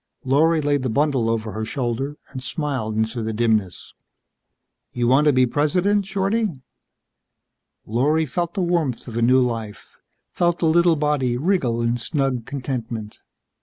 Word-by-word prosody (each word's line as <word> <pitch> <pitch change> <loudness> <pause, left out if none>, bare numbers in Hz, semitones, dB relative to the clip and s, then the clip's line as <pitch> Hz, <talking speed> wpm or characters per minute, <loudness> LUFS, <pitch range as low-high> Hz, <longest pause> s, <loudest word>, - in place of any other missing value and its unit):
Lorry 155 +5 +3
laid 145 -1 +1
the 130 - -1
bundle 135 -2 +1
over 115 -1 -2
her 110 +1 -4
shoulder 130 +4 -3
and 130 -2 -6
smiled 130 -7 -3
into 110 +2 -1
the 110 0 -3
dimness. 110 -5 -1 1.0
"You 120 -1 0
want 135 +4 +4
to 150 - +6
be 130 -1 +4
president, 180 +10 +1
Shorty?" 200 +3 0 1.4
Lorry 145 +8 +1
felt 170 +6 -3
the 190 - 0
warmth 170 -9 -1
of 115 - -7
a 120 - 0
new 125 +3 +5
life, 115 -3 -5 0.3
felt 175 -1 +1
the - - -1
little 170 +1 +4
body 145 -5 0
wriggle 130 -7 0
in 115 +1 +1
snug 130 -1 -1
contentment. 120 -6 -5
130 Hz, 150 wpm, -22 LUFS, 115-160 Hz, 1.4 s, to